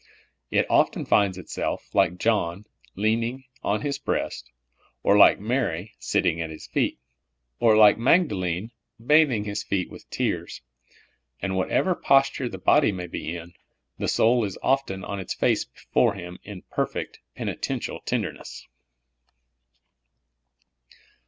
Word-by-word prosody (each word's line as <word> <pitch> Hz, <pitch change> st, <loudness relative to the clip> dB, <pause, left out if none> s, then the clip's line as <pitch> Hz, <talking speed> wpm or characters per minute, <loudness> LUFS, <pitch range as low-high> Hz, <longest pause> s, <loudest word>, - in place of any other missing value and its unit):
It -, -, +2 dB
often -, -, +2 dB
finds 100 Hz, -3 st, +2 dB
itself, 90 Hz, -, -4 dB
like 90 Hz, -, +2 dB
John, 100 Hz, -2 st, 0 dB, 0.3 s
leaning 115 Hz, +5 st, 0 dB, 0.2 s
on 105 Hz, +1 st, 0 dB
His 140 Hz, +1 st, -2 dB
breast; 140 Hz, -, -3 dB, 0.5 s
or, 100 Hz, -, +4 dB
like 105 Hz, -, +7 dB
Mary, 110 Hz, -4 st, -2 dB
sitting 85 Hz, -, 0 dB
at 80 Hz, -, -3 dB
His 80 Hz, -, -9 dB
feet; -, -, -1 dB, 0.6 s
or, 110 Hz, -2 st, +5 dB
like 105 Hz, 0 st, +7 dB
Magdalene, 110 Hz, -, +1 dB, 0.3 s
bathing 150 Hz, -7 st, +4 dB
His 105 Hz, -1 st, -3 dB
feet 95 Hz, -2 st, -2 dB
with -, -, -13 dB
tears; -, -, -3 dB, 0.8 s
and 95 Hz, -, -2 dB
w^hatever 95 Hz, -, +1 dB
posture 135 Hz, -2 st, +3 dB
the 95 Hz, -, -7 dB
body 140 Hz, +7 st, +4 dB
may 90 Hz, -2 st, -5 dB
be 85 Hz, -1 st, -5 dB
in, 85 Hz, +1 st, -11 dB, 0.5 s
the -, -, -1 dB
soul 120 Hz, +1 st, +3 dB
is 100 Hz, -3 st, -4 dB
often 130 Hz, -9 st, 0 dB
on 100 Hz, -1 st, -5 dB
its 95 Hz, -, -4 dB
face -, -, +1 dB
before 115 Hz, -5 st, 0 dB
Him 90 Hz, -2 st, -8 dB
in 100 Hz, -3 st, -9 dB
perfect, -, -, -3 dB, 0.2 s
penitential -, -, -4 dB
tenderness. -, -, -4 dB
105 Hz, 130 wpm, -25 LUFS, 90-120 Hz, 0.8 s, like